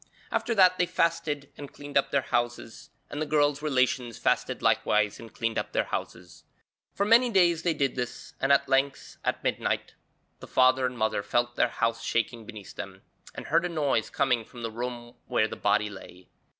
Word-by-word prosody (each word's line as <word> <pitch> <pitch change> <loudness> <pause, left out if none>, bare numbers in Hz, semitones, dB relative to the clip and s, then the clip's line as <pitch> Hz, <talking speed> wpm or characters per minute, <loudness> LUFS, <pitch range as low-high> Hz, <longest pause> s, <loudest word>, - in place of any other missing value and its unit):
After 235 - 0
that 185 -2 +5
they 180 - +3
fasted 150 -5 -1
and 145 -1 -8
cleaned 145 0 -11
up 140 - +3
their 140 -2 +1
houses, 120 -1 -3 0.2
and 145 - -4
the - - 0
girl's 145 -1 +2
relations 130 -5 0
fasted - - 0
likewise 105 -1 +2
and 115 -1 -11
cleaned 115 -1 -1
up - - -5
their - - +2
houses. - - -6 0.5
For 200 - +1
many 235 +3 +5
days 175 -6 +3
they 170 -2 0
did 135 -2 0
this, 125 -1 -5
and 135 - +2
at 140 0 +4
length, 135 +1 0
at - - -2
midnight, - - -1 0.5
the - - -10
father 130 0 +4
and 125 -1 -7
mother 110 -2 0
felt 120 +3 0
their - - +2
house 115 0 -1
shaking 115 -1 -1
beneath 105 -5 -10
them, - - -8 0.3
and - - -7
heard 170 +3 +2
a 175 - -1
noise 145 -9 0
coming 125 -5 +1
from 120 +2 -11
the 115 - -3
room 120 +1 -6
where - - +2
the - - -7
body 105 - +1
lay. 90 -2 -13
130 Hz, 190 wpm, -27 LUFS, 115-150 Hz, 0.5 s, that